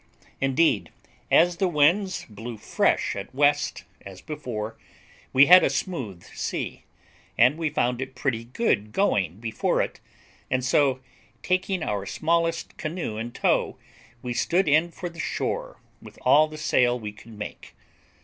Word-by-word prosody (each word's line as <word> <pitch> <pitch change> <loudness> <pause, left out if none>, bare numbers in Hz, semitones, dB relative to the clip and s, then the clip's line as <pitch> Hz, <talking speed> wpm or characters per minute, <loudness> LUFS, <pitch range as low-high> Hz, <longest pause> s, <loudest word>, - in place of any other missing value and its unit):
Indeed, 135 +5 +2 0.4
as 175 +1 +4
the 190 - +2
winds 175 +5 +2
blew 110 +2 -8
fresh - - +1
at 100 +5 -7
west, 145 -9 +2 0.2
as 95 -1 -10
before, 115 -8 -5 0.6
we 135 +2 +7
had 180 +4 +8
a - - +3
smooth 115 - -4
sea, - - -4 0.5
and 125 +5 +5
we 160 -1 -1
found 125 -4 0
it 130 0 -6
pretty 115 -4 -2
good 115 - -1
going 100 - +1
before 110 -1 -1
it, - - -2 0.5
and 130 0 0
so, 135 -1 +2 0.4
taking 185 -1 0
our 100 -5 -2
smallest 165 +1 -1
canoe 155 -9 -4
in 115 +2 -4
tow, - - 0 0.5
we 125 -1 -3
stood 175 +8 +1
in 155 +3 +4
for 175 +1 -6
the 170 -1 -11
shore - - -3 0.2
with - - -13
all 155 +2 +6
the 155 0 -10
sail 125 -4 +2
we 105 -2 -6
could 110 +1 -14
make. 105 - -8
135 Hz, 150 wpm, -25 LUFS, 115-165 Hz, 0.6 s, had